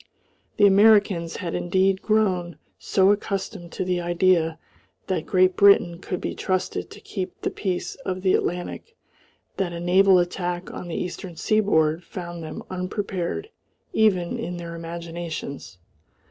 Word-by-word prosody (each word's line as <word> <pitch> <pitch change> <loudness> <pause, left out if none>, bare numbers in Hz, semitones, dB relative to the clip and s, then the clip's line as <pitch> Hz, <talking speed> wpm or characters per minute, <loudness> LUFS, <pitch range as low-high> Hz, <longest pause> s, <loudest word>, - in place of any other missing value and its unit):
The 205 - +6
Americans 200 -4 +4
had 170 -4 -4
indeed 190 +2 +1
grown 190 -6 +1 0.2
so 190 0 +3
accustomed 195 -3 -3
to 185 - -2
the 180 -1 0
idea 175 -2 +2 0.5
that 185 -4 -2
Great 185 0 +3
Britain 185 -4 +5
could 180 -1 -4
be - - -3
trusted 185 -1 -2
to - - -12
keep 185 -3 -6
the - - -1
peace 185 -3 -3
of 185 -8 -4
the 185 - +3
Atlantic 180 - -2 0.6
that 180 -3 -1
a 170 - -5
naval 185 +2 +5
attack 175 0 -2
on 180 - -7
the 170 - -5
eastern 180 -1 -5
seaboard 170 -6 +2
found 175 -2 -7
them 155 -1 -7
unprepared 185 - -3 0.4
even 190 -6 +2
in 175 +1 -4
their 170 -1 -7
imaginations. 165 - -6
180 Hz, 140 wpm, -24 LUFS, 170-195 Hz, 0.6 s, The